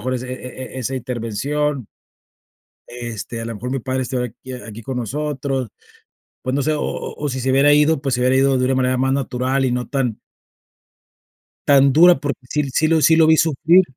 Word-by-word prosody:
mejor 130 +4 -2
ese 125 0 -5
e 130 0 -8
e - - -7
e - - -4
esa 130 +1 -3
intervención". 130 +2 -2 1.0
Este, 120 -1 -6
a - - -5
lo 115 - -4
mejor 125 +5 -5
mi 135 - -1
padre 130 +1 -2
estuviera 125 -1 -2
aquí 130 +3 -11
aquí 115 -3 -9
con 125 +3 -5
nosotros. 135 0 -3 0.7
Pues, 130 - -2
no 140 - +1
sé, 155 - +1
o 150 - -2
o - - -4
o 145 - 0
si 130 -1 -3
se 130 +1 0
hubiera 140 +2 +5
ido, 150 0 +3
pues, 135 -3 -1
se 125 - -2
hubiera 130 +1 +3
ido 135 0 +3
de 125 - +1
una 130 +1 +1
manera 130 0 +1
más 130 +1 +1
natural 135 0 -1
y 125 - +1
no 125 0 -2
tan 130 -6 -2 1.5
tan 140 -1 +5
dura, 175 +4 +7
porque 140 -4 -3
sí 150 0 0
sí 155 - +2
lo 160 -1 +3
sí 160 - +5
lo 160 -1 +5
vi 160 0 +5
sufrir. 165 +3 +4
130 Hz, 215 wpm, -20 LUFS, 125-145 Hz, 1.5 s, dura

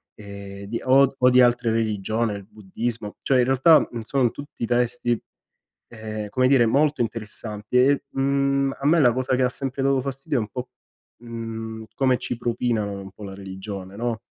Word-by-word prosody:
ehm, 100 -1 -9
di 115 +3 -4
o 135 +1 +5
o 125 0 +5
di 125 0 +6
altre 120 -1 +3
religione, 110 0 0
il 100 -1 -9
buddismo. 105 +1 -5
Cioè, 130 -2 +2
in 120 - +4
realtà, 135 +5 +6
mhmm, 120 - -5
sono 125 +1 +1
tutti 145 -4 -6
testi, 120 0 0 0.7
ehm, 110 -2 -6
come 130 +3 +2
dire, 130 -3 +5
molto 145 +5 +2
interessanti. 110 0 -3
E, 140 +3 +4
mhmm, 140 0 +1
a 140 - -6
me 165 +2 +5
la 120 -5 +5
cosa 130 0 0
che 130 - +2
ha 125 - +3
sempre 135 +1 -4
dato 135 -1 +2
fastidio, 135 +2 -3
è - - +2
un 105 - -5
po', 125 -1 -6 0.5
mhmm, 115 -1 -6
come 130 -2 +2
ci 125 - -4
propinano 115 -4 -1
un 95 0 -9
po' 105 - -13
la 95 -1 -7
religione, 95 0 -8
no? 115 0 -2
120 Hz, 185 wpm, -24 LUFS, 110-130 Hz, 0.7 s, di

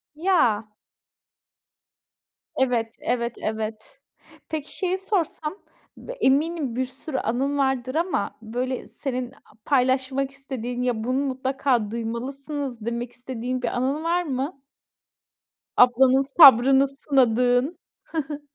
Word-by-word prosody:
Ya. 300 - +2 1.9
Evet, 240 -3 0
evet, 235 -1 -1
evet. 220 - -5 0.5
Peki, 310 -2 -4
şeyi 370 -1 0
sorsam. 360 -5 -2 0.4
B - - -9
eminim 300 - +1
bir 260 +1 0
sürü 265 +3 -6
anın 265 +5 -1
vardır 265 -1 0
ama, 335 - -1
böyle, 245 +3 -3
senin 255 -2 -4
a 265 - -21 0.3
paylaşmak 265 0 +1
istediğin, 255 -3 -5
ya 235 -3 -1
"Bunu 255 +3 0
mutlaka 260 -4 0
duymalısınız." 250 +2 -4
demek 235 +1 -3
istediğin 250 0 -5
bir 245 - -1
anın 265 +6 -1
var 345 +2 +1
mı? 275 -1 -4 1.1
Ablanın 255 +2 +5
sabrını 270 -2 +8
sınadığın. 255 +1 +2 0.5
Hı - - -2
hı. 290 - -12
260 Hz, 110 wpm, -24 LUFS, 245-280 Hz, 1.9 s, sabrını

